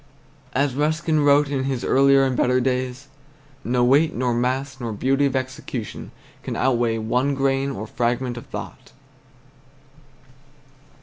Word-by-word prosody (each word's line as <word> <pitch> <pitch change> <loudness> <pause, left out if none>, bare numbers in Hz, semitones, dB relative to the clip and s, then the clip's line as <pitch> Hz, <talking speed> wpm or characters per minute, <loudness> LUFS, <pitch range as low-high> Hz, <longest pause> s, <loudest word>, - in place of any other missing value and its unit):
As 140 0 +1
Ruskin 155 +3 0
wrote 145 0 +4
in 135 -2 -1
his 135 -3 -2
earlier 135 0 +4
and 130 -1 0
better 125 +1 +2
days, 130 +1 -2 0.6
"No 120 +1 +1
weight 145 +6 +3
nor 125 0 0
mass 130 +3 -2
nor 115 -3 -4
beauty 135 +6 +1
of 135 - -3
execution 130 -3 -5 0.3
can - - -5
outweigh 120 -3 +1
one 125 +5 0
grain 135 0 0
or 110 -6 -5
fragment 120 +2 -1
of 120 - -9
thought." - - -9
130 Hz, 135 wpm, -22 LUFS, 125-140 Hz, 0.6 s, wrote